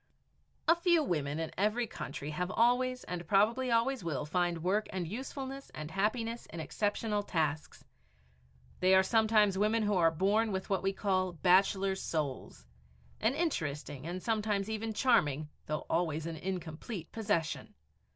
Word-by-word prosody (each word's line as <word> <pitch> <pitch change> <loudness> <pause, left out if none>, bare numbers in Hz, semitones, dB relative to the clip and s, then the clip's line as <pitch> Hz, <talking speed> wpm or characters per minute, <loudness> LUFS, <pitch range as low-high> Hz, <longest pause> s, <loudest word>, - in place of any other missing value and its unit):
A - - +8
few 340 -2 +3
women 150 - -1
in 160 -1 -3
every 215 +4 +2
country 145 -7 -6
have 180 +4 -2
always 250 +3 +2
and 175 -2 -5
probably 225 +7 +3
always 235 0 +1
will 150 -3 -2
find 175 +1 0
work 205 +4 +1
and 180 -3 -3
usefulness 270 - -6
and 155 +1 -6
happiness 225 +4 -1
in 165 - -8
exceptional 210 +4 -1
tasks. 160 -6 -2 0.9
They 185 +1 +5
are 190 - +6
sometimes 215 -2 +3
women 215 +2 +2
who 210 0 +1
are 170 -4 +4
born 200 +7 +1
with 190 +1 -4
what 190 -2 +2
we 195 +1 +1
call 185 -2 0
"bachelor's 190 +2 +3
souls" 140 - -4 0.5
an 225 +5 +1
interesting 150 - -2
and 180 +1 -5
sometimes 215 -2 0
even 220 +1 -2
charming, 155 - +2 0.2
though 155 0 -3
always 160 -2 0
an 165 -1 -4
incomplete, 180 +1 -5
possession! 205 -8 -2
195 Hz, 150 wpm, -32 LUFS, 165-225 Hz, 0.9 s, A